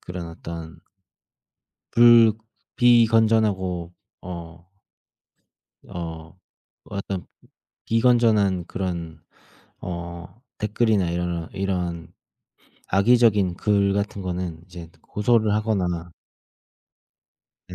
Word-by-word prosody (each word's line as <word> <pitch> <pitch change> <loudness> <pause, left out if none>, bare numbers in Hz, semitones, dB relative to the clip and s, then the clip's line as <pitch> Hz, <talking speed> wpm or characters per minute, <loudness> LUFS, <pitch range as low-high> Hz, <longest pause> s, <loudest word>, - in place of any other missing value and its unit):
그런 90 -1 -7
어떤 80 0 -9 1.1
불 120 -1 +7 0.4
비건전하고 110 -7 +3 0.3
어 85 -1 -9 1.2
어 80 -1 -7 0.5
어떤 100 -2 -5 0.6
비건전한 115 -6 +3
그런 85 -5 -5 0.6
어 85 +3 -7 0.2
댓글이나 105 -3 +1
이러러 85 -1 -3
이런 90 -3 -3 0.8
악의적인 105 -3 +3
글 100 -2 +2
같은 100 0 -2
거는 90 -3 -4
이제 85 -3 -11
고소를 110 0 +1
하거나 90 -6 -1 1.6
예 - - -7
95 Hz, 160 characters per minute, -23 LUFS, 85-110 Hz, 1.6 s, 불